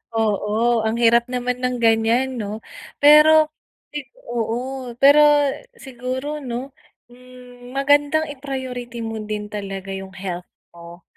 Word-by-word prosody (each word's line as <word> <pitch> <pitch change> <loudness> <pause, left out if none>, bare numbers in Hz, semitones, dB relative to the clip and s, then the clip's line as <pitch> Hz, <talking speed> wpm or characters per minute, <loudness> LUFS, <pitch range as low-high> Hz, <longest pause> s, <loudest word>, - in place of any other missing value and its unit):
Oo 220 +2 +1
ang 220 +1 0
hirap 235 0 +4
naman 250 0 -2
ng 250 0 -1
ganiyan 230 +3 +2
ano. 210 0 -5 0.4
Pero 305 +1 +7 0.4
ay 295 - -3 0.3
oo. 240 +2 -3
Pero, 285 +2 +7 0.6
siguro 260 - -5
ano, 255 +1 -6 0.4
hmm, 250 0 -15
magandang 290 +3 +3
i-priority 255 -3 -6
mo 225 -1 -5
din 210 0 -4
talaga 195 -2 -6
iyung 190 0 -8
health 180 -2 -6 0.3
mo. 170 +1 -13
245 Hz, 120 wpm, -21 LUFS, 220-265 Hz, 0.6 s, Pero